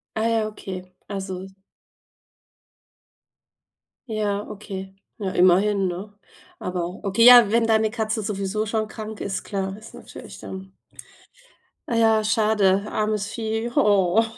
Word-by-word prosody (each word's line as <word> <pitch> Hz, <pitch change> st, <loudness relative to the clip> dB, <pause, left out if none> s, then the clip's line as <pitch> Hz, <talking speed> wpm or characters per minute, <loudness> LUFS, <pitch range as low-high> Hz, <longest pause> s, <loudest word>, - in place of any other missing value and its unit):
Ah 220 Hz, +1 st, +1 dB
ja, 225 Hz, -2 st, +1 dB
okay. 185 Hz, -3 st, -8 dB
Also 190 Hz, -2 st, -5 dB, 2.6 s
Ja, 210 Hz, -2 st, -2 dB
okay. 195 Hz, -2 st, -8 dB, 0.2 s
Na, 195 Hz, -3 st, -3 dB
immerhin, 190 Hz, +2 st, +4 dB
ne? 200 Hz, +4 st, -6 dB, 0.4 s
Aber 180 Hz, 0 st, -4 dB
okay, 200 Hz, +3 st, +2 dB
ja, 240 Hz, -3 st, +9 dB
wenn 230 Hz, 0 st, +3 dB
deine 220 Hz, -1 st, +2 dB
Katze 220 Hz, -1 st, -2 dB
sowieso 205 Hz, +1 st, -2 dB
schon 215 Hz, 0 st, -1 dB
krank 215 Hz, 0 st, -8 dB
ist, 195 Hz, -1 st, -3 dB
klar, 195 Hz, -1 st, -4 dB
ist 220 Hz, +1 st, -13 dB
natürlich -, -, -11 dB
dann 190 Hz, 0 st, -9 dB, 1.2 s
Ah 235 Hz, -, -1 dB
ja, 225 Hz, -1 st, +4 dB
schade, 210 Hz, -3 st, +2 dB
armes 215 Hz, -1 st, -1 dB
Vieh. 225 Hz, 0 st, -3 dB
Oh, 205 Hz, 0 st, +4 dB
210 Hz, 120 wpm, -23 LUFS, 190-220 Hz, 2.6 s, ja